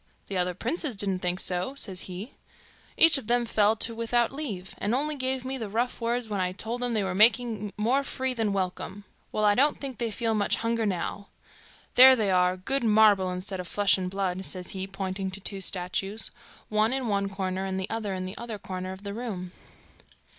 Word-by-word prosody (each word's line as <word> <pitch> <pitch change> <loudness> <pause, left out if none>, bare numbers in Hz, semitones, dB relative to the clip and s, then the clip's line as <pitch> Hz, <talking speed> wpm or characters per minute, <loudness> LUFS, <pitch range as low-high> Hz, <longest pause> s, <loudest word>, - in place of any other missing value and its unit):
'The 195 - -4
other 180 0 0
princes 260 - -2
didn't 195 -2 0
think 180 0 -1
so,' 180 +10 -1
says 190 -9 +1
he. 190 +7 -7 0.6
'Each 320 -4 +7
o' - - -8
them 240 +1 +1
fell 215 -1 +3
to 230 +1 0
without 230 +1 +1
leave, 225 -11 -5
and 210 +4 0
only 300 +3 0
gave 260 -1 -2
me 265 0 -2
the 220 -3 -4
rough 235 +4 -1
words 235 0 -1
when 205 -2 -2
I 180 0 -1
told 225 +5 -4
them 245 -1 0
they 215 -2 +1
were 190 -1 -2
making 220 0 +3
more 240 +6 +2
free 260 -1 -1
than 225 -4 0
welcome. 195 +1 -3 0.3
Well, 215 - 0
I 205 - +6
don't 280 +7 +3
think 270 -4 -6
they 235 -1 -1
feel 225 +1 -1
much 205 -2 +2
hunger 230 -1 0
now. 195 +1 -3 0.7
There 260 +1 +9
they 215 -5 +1
are, 180 0 +3
good 255 +9 -1
marble 210 -4 +5
instead 185 +1 -5
of 180 - -5
flesh 205 +2 +3
and 185 -1 -3
blood,' 190 -1 -2
says 180 -2 -4
he, 190 0 -4
pointing 195 0 -3
to 190 +1 -7
two 195 0 -5
statues, 195 +3 -2 0.4
one 215 +3 +2
in 265 -2 -1
one 200 -2 0
corner, 190 -1 -3
and 190 0 -2
the 190 - -2
other 215 -4 -2
in 185 0 -4
the 185 - -6
other 235 -2 -5
corner 185 -1 -5
of 190 +1 -12
the 200 -1 -5
room. 200 -6 -5
205 Hz, 210 wpm, -27 LUFS, 190-235 Hz, 0.7 s, There